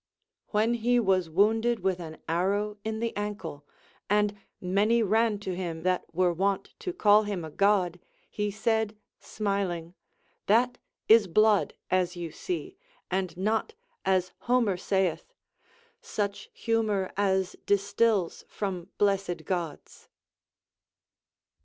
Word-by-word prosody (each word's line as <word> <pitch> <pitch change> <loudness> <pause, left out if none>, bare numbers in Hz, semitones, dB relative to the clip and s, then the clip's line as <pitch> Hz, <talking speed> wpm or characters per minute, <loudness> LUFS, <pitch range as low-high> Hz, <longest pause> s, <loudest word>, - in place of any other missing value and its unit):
ΛVllen 225 +3 +2
he 240 +2 +3
was 190 -6 +2
wounded 220 +6 +2
with 190 -2 0
an 160 -2 -7
arrow 200 +5 0
in 220 0 -3
the 230 -1 -2
ankle, 190 -8 -5 0.4
and 210 0 +2 0.2
many 205 +6 +2
ran 220 +1 +2
to 190 -3 -4
him 170 -3 -4
that 185 0 +1
were 180 +1 +2
wont 195 +2 -1
to 365 - -3
call 210 - +5
him 200 -5 -3
a 155 - -8
God, 190 -2 +2 0.3
he 210 0 -2
said 220 0 0 0.2
smiling: 190 -5 -2 0.5
That 245 +4 +3 0.3
is 220 -2 +7
blood, 215 +3 +3 0.2
as 180 -1 +1
you 170 -2 -5
see, 370 - -5 0.3
and 185 -2 -1
not, 220 - 0 0.3
as 185 -1 +1
Homer 240 -5 +2
saith, 180 -3 -1 0.4
— 470 0 -34
Such 200 -1 -3 0.2
liumor 220 -5 +1
as 190 -1 +1
distils 200 -1 +1
from 185 -3 -4
blessed 195 -5 0
Gods. 170 -5 -5
200 Hz, 125 wpm, -28 LUFS, 180-220 Hz, 0.5 s, is